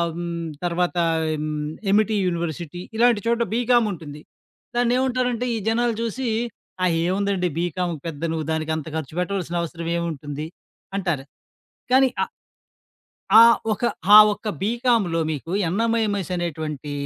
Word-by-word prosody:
హ్మ్ 170 -1 -4 0.2
తర్వాత 175 0 0 0.4
హ్మ్. 155 0 -3 0.4
'Amity' 215 +1 +3
university. 170 0 -3 0.2
ఇలాంటి 235 -3 +4
చోట 235 0 +1
బీకామ్ 240 -1 +3
ఉంటుంది. 150 -4 -8 0.5
దాన్ని 240 0 +2
ఏముంటారంటే 250 -2 0
ఈ - - -1
జనాలు 235 +1 +1
చూసి. 235 +3 -2 0.6
ఆహ్, 170 - +2
ఏముందండి 190 -1 0
బీకామ్ 175 0 -1
పెద్ద 160 -3 -6
నువ్వు 160 -1 -2
దానికి 160 0 -1
అంత 155 -1 -6
ఖర్చుపెట్టవాల్సిన 175 +3 -3
అవసరం 170 0 -5
ఏముంటుంది? 150 -2 -4 0.5
అంటారు. 175 -8 -2 0.7
కానీ 265 0 +6
ఆ - - +3 1.1
ఆ - - +11 0.3
ఒక్క 215 +3 -1 0.3
ఆ - - +13 0.2
ఒక్క 215 - -9
బీకామ్‌లొ 225 -6 +1
మీకు 155 +3 -5
యన్నామయమస్ 205 0 0
అనేటువంటి 155 -4 -4
180 Hz, 125 wpm, -23 LUFS, 165-225 Hz, 1.1 s, ఆ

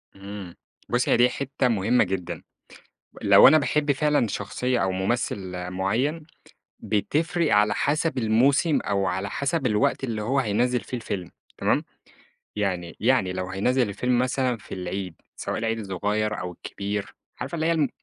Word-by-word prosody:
إمم، 100 -2 -8 0.3
بُصّي 125 +1 +1
هي - - +5
دي 120 +1 +5
حتة 135 0 -1
مهمة 115 +2 +3
جدًا، 90 -2 -4 0.8
لو - - +8
أنا 155 - +7
باحب 150 0 +1
فعلًا 145 -3 +2
شخصية 125 +5 -2
أو 95 - +1
ممثل 95 -2 -2
معيَّن، 115 - -1 0.6
بتفرق 150 - 0
على 105 0 +4
حسب 150 +1 0
الموسم 130 +7 +3
أو 100 -1 0
على 95 +1 -2
حسب 140 0 -1
الوقت 105 +3 +1
اللي 110 -4 -3
هو 130 +6 0
هينزِّل 120 +2 +1
فيه 125 - -6
الفيلم 95 -7 -5 0.3
تمام، - - +1 0.7
يعني 90 -4 -2
يعني 115 -6 +2
لو 90 0 -4
هينزِّل 120 +6 +1
الفيلم 120 +5 0
مثلًا 130 0 +1
في 110 - -9
العيد 90 -1 -4 0.2
سواء - - -3
العيد 115 0 -1
الصغير 105 +2 -1
أو 90 0 -4
الكبير، 100 +3 -5 0.3
عارفة - - -4
اللي 160 0 0
هي 170 - +3
الم 155 -4 +2
110 Hz, 155 wpm, -25 LUFS, 95-130 Hz, 0.8 s, لو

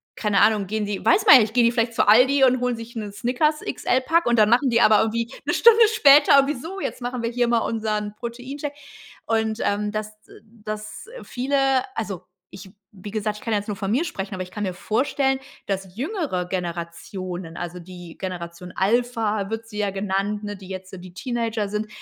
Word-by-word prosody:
keine 210 -2 +1
Ahnung, 210 -2 +3
gehen 215 +1 -2
die, 205 -1 -4
weiß 395 +4 +4
man 380 - +11
ja 255 - +8
nicht, 215 0 -1
gehen 245 0 +4
die 235 - +4
vielleicht 230 -1 0
zu 225 - +1
Aldi 260 +6 +5
und 255 -1 +4
holen 250 0 0
sich 230 +1 -10
'ne 210 -3 -5
Snickers-XL-Pack 260 +5 0
und 240 -1 +2
dann 210 0 +5
machen 255 +4 +3
die 235 -1 +3
aber 215 -2 +6
irgendwie 230 +2 -1
'ne - - 0
Stunde 465 0 +6
später 285 -7 +7
irgendwie: 275 +2 +1
„So, 370 +8 -7
jetzt 260 - -4
machen 245 0 -4
wir 230 - 0
hier 240 0 0
mal 235 -1 +3
unseren 215 -2 -2
Protein-Shake." 255 +6 -6 0.5
Und, 220 0 0
ähm, 210 +1 -1
dass 215 0 -4 0.3
dass 215 - -8 0.2
viele 265 +3 -2 0.4
also, 205 -6 -4 0.3
ich 190 0 -12 0.3
wie 205 +2 -8
gesagt, 215 0 -2
ich - - -13
kann 230 - -3
ja 210 - +2
jetzt 205 - -9
nur 205 -2 -4
von 195 0 -3
mir 270 +10 +1
sprechen, 195 - -5
aber 185 - -5
ich 180 - -6
kann 210 +3 -5
mir 185 -2 -2
vorstellen, 265 +7 0 0.3
dass 190 -2 -4
jüngere 275 - -2
Generationen, 175 0 -5
also 175 0 -5
die 175 -1 -11
Generation 180 -1 -7
Alpha 215 -1 0
wird 225 0 -4
sie 210 - -9
ja 205 -1 0
genannt, 195 +1 -2
ne, 205 0 -5
die 190 -1 -13
jetzt 190 0 -7
so 190 - -8
die 180 0 -12
Teenager 225 0 -2
sind 210 +1 -3
215 Hz, 205 wpm, -23 LUFS, 195-245 Hz, 0.5 s, man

